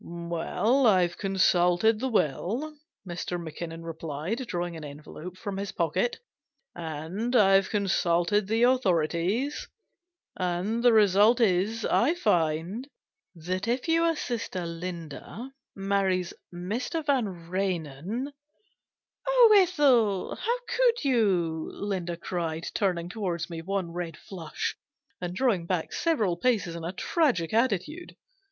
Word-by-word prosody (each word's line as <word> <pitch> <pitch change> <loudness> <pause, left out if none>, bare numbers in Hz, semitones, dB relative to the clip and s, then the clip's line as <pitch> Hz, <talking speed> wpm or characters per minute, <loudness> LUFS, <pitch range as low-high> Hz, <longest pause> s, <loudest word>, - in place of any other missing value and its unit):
" - - -19
Well, 170 +10 0
I've 180 -4 +3
consulted 190 +2 +3
the 260 +2 -1
will," 225 - 0 0.3
Mr. 175 0 -4
Mac 160 -3 -8
kinnon 165 -1 -6
replied, 165 - -4
drawing 175 -3 -3
an 160 - -8
envelope 150 +5 -9
from 200 -1 -5
his 200 0 -4
pocket; 180 +8 0 0.6
"and 170 +9 -4
I've 195 -3 +5
consulted 195 -1 +1
the 225 +2 +2
authorities, 200 - +1 0.7
and 185 +6 -1
the 245 - +7
result 210 +2 +5
is, 215 +1 +2
I 290 +9 +3
find, 175 - 0 0.5
that 185 +5 -3
if 245 +5 -1
your 330 0 +3
sister 225 - -3
Linda 170 - -7 0.2
marries 195 -2 0 0.2
Mr. 225 - -3
Vanrenen 190 - -2 0.3
" 370 -3 -45
" - - -29
Oh, - - +7
Ethel, 275 - +3
how 475 +2 -1
could 485 -5 +2
you! 185 - +1
" - - -16
Linda 180 -4 -3
cried, 165 -2 -3
turning 180 -4 0
towards 180 -4 -3
me 165 -1 -5
one 190 0 -2
red 170 -2 -5
flush, 170 -5 -5 0.5
and 180 0 -4
drawing 200 -8 +1
back 180 -3 -2
several 220 - +1
paces 200 -6 +1
in 170 - -6
a 170 - -3
tragic 225 - 0
attitude. 235 - 0
190 Hz, 125 wpm, -27 LUFS, 170-235 Hz, 0.7 s, the